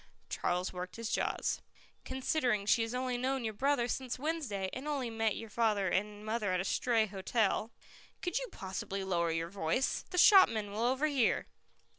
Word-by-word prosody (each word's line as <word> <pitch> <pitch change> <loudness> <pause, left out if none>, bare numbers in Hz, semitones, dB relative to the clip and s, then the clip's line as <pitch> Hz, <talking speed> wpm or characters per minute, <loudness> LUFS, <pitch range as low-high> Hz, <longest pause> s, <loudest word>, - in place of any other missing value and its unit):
Charles 180 +1 -1
worked 180 0 -6
his 230 -1 -4
jaws. - - 0 0.4
"Considering 255 -5 0
she 225 - +4
has 225 +2 -2
only 250 -1 -1
known 260 0 0
your 220 -1 -2
brother 265 +2 +1
since 255 0 -3
Wednesday, 265 -10 -2
and 265 +4 -5
only 270 -6 -2
met 225 -1 0
your 225 -2 -8
father 210 -4 +1
and 210 +3 -2
mother 215 -3 -1
at 185 - +1
a - - 0
stray 230 +1 +2
hotel 210 +2 0 0.3
" - - -24
"Could 360 +6 0
you - - -5
possibly 195 +1 -4
lower 170 -3 0
your 165 +1 -1
voice? 195 +6 0
The 360 - -5
shopman 230 - +6
will 210 +2 -3
overhear." 265 +1 +2
225 Hz, 175 wpm, -33 LUFS, 200-260 Hz, 0.4 s, shopman